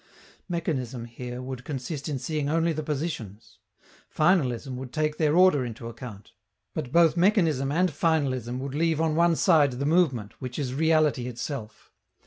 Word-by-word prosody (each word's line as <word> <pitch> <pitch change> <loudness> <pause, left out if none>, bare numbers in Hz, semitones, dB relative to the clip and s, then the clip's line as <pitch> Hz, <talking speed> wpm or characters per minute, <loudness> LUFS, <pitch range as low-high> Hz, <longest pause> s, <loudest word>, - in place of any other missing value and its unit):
Mechanism, 130 -8 -3
here, 125 +1 -7
would 130 -1 -6
consist 140 +2 -5
in 145 - -2
seeing 150 +1 -2
only 165 +1 +1
the 155 - -3
positions. 145 - -5 0.5
Finalism 140 -7 +1
would 130 -1 -7
take 155 +1 -1
their 155 0 +2
order 180 -7 +5
into 115 -1 -6
account. 115 -3 -9 0.4
But 140 -6 -4
both 170 0 +5
mechanism 170 - +2
and 180 +3 +2
finalism 135 -6 0
would 135 0 -5
leave 160 +1 +1
on 160 -1 +1
one 170 0 +4
side 150 -6 +4
the 135 +3 -3
movement, 145 - +2
which 125 -1 -6
is 130 -4 -2
reality 155 -4 +2
itself. 125 -2 -6
145 Hz, 155 wpm, -26 LUFS, 125-160 Hz, 0.5 s, order